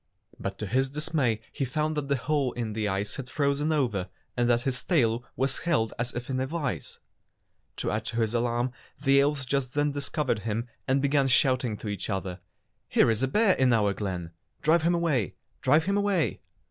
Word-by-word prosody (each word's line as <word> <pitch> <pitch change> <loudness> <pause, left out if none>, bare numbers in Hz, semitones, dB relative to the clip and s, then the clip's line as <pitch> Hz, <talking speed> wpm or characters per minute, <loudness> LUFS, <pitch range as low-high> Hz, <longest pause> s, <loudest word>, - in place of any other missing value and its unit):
But - - -4
to 105 - -4
his 130 +6 +1
dismay 140 -6 0
he 145 - -3
found 150 +4 -1
that 150 -2 -2
the 140 - +2
hole 135 +1 0
in 115 -3 -3
the 110 -1 -1
ice 100 +1 -2
had 130 -3 -6
frozen 145 +2 +1
over, 115 -11 0 0.3
and 120 -1 +2
that 120 0 +3
his 125 -2 -2
tail 120 -9 +2
was 135 +1 0
held 150 -10 +1
as 120 0 0
if 120 +1 -4
in 130 -1 -1
a 130 - 0
vise. 140 - -3 0.8
To - - -2
add 110 +1 -2
to 115 0 -1
his 110 0 0
alarm 120 +1 +1 0.3
the 135 0 +4
elves 140 -1 0
just 130 0 -1
then 145 0 +2
discovered 140 -3 -1
him 110 +3 -2 0.2
and 135 +1 +2
began 140 -1 +3
shouting 130 -4 +2
to 110 - -7
each 100 -1 -3
other: 95 -2 -3 0.5
"Here - - +4
is 110 +1 -1
a 135 - +2
bear 210 - +4
in 130 -4 +3
our 105 -3 +3
glen! 90 -5 -4 0.3
Drive 160 +2 +4
him 170 +2 +2
away! 150 - 0 0.3
Drive 150 +5 +4
him 200 +3 +1
away!" 200 -5 +1
130 Hz, 200 wpm, -28 LUFS, 115-145 Hz, 0.8 s, the